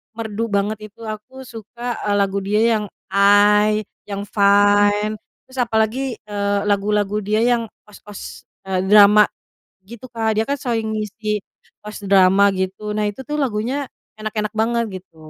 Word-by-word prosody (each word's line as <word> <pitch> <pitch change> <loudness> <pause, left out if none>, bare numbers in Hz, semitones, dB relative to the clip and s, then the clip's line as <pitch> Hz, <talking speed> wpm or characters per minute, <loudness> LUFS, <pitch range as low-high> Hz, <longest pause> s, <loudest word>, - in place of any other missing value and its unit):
merdu 225 0 -3
banget 205 0 -1
itu. 220 +3 -28
Aku 220 +5 -8
suka, 235 0 -7
eee, 205 - +2
lagu 200 0 +1
dia 205 +2 0
yang 215 -1 +1 0.3
I, 210 +1 +4 0.2
yang 200 0 -4
Fine, 205 +1 +3 0.2
terus 260 0 -10
apalagi, 230 +2 0
eee, 205 -1 -1
lagu-lagu 205 0 0
dia 215 +2 0
yang 235 -2 +1 0.2
OST-OST, 210 -1 -11 0.2
eee, 190 -1 -2
drama 210 0 +7 0.6
gitu, 235 +1 -11
Kak 220 -2 -1
dia 220 - +2
kan 280 +4 -2
sering 225 -4 -2
ngisi 210 0 -3 0.4
OST 210 -1 -9
drama 195 +1 +5
gitu. 190 +3 -3
Nah, 210 0 0
itu 205 +6 -7
tuh 300 +2 -3
lagunya 255 +3 -2 0.3
enak-enak 215 0 -3
banget 235 +1 +1 0.2
gitu. 180 -3 -33
210 Hz, 145 wpm, -20 LUFS, 205-225 Hz, 0.6 s, drama